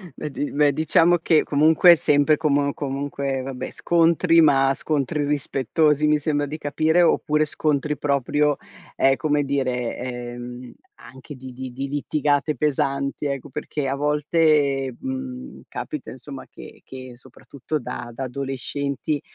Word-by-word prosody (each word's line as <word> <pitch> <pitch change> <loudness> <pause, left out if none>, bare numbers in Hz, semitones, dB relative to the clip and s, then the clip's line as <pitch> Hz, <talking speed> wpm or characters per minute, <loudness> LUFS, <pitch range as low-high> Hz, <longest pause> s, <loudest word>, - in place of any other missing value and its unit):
Beh, 150 - -6
di 145 +1 -4
beh, 145 0 +3
diciamo 165 +3 +3
che 160 -1 +2
comunque 155 +4 +5
è - - +8
sempre 150 -1 +3
como 145 -2 +1
comunque 140 -1 -3
vabbè, 130 -1 -6
scontri 165 0 +3
ma 135 -3 +4
scontri 150 +1 -1
rispettosi 150 +1 +1
mi 150 0 +4
sembra 145 0 -1
di 150 +2 -6
capire, 155 +3 +1
oppure 150 -2 +2
scontri 150 0 -1
proprio, 145 +1 +1 0.4
ehm, 135 0 +3
come 150 -1 +1
dire, 130 -4 -1
ehm, 120 0 -7 0.2
anche 130 - -12
di 130 0 -10
di 130 +1 -7
di 135 +3 -4
litigate 145 +1 0
pesanti 140 -1 -1
ecco. 140 0 -3
Perché 145 0 -4
a 135 - -1
volte, 145 -2 +1
mhmm, 265 -1 -6
capita 305 -2 -6
insomma 130 +1 -10
che - - -13
che 130 -1 -10
soprattutto 130 +4 -7
da 120 -1 -6
da 135 - -5
adolescenti, 140 +2 -3
145 Hz, 140 wpm, -23 LUFS, 135-150 Hz, 0.4 s, è